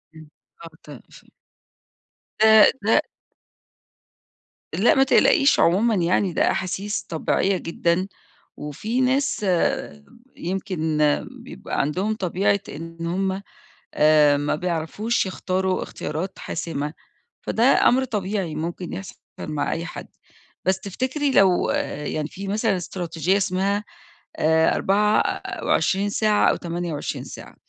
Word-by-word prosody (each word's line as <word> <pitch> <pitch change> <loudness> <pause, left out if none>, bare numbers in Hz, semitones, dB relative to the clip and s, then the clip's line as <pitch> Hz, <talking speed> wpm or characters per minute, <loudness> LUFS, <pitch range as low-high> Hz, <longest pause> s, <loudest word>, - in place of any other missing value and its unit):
إمم. 155 -1 -13 0.3
آه، 165 - -9
ت - - -21 0.3
ف - - -17 1.1
آآ، 220 0 +8 0.2
ده 225 +7 +4 1.7
لأ، 220 +5 +3
ما 270 - +5
تقلقيش 275 +1 +4
عمومًا 210 +7 +3
يعني، 180 +1 +1
ده - - +2
أحاسيس 195 +3 -2
طبيعية 185 +4 0
جدًا، 170 +2 -1 0.5
وفي 210 - -3
ناس 260 -3 +1 0.9
يمكن 175 -4 -3 0.5
بيبقى 65 - -4
عندهم 185 +10 -1
طبيعة 195 +1 0
إن 165 +2 -7
هُم، 190 +2 -1 0.5
آآ، 150 -1 +5
ما 145 +1 -1
بيعرفوش 180 +8 -1
يختاروا 185 0 -1
اختيارات 165 +6 -5
حاسمة، 155 -3 -4 0.5
فده 225 - -1 0.2
أمر 260 +2 +3
طبيعي 200 -7 -3
ممكن 170 +2 -5
يحصل 195 -1 -7 0.2
مع 150 -2 -2
أي 165 +1 -4
حد. - - -8 0.6
بس 190 0 +2
تفتكري 260 - -2
لو 190 -7 +4 0.4
يعني 150 0 -2
في 195 +5 -8
مثلًا 210 0 0
إستراتيجية 175 0 -1
اسمها، 195 +1 0 0.5
آآ، 160 +1 +3
24 205 -1 +1
ساعة 210 0 +2
أو - - +2
28 170 -3 -4
ساعة، - - -11
185 Hz, 110 wpm, -23 LUFS, 165-205 Hz, 1.7 s, آآ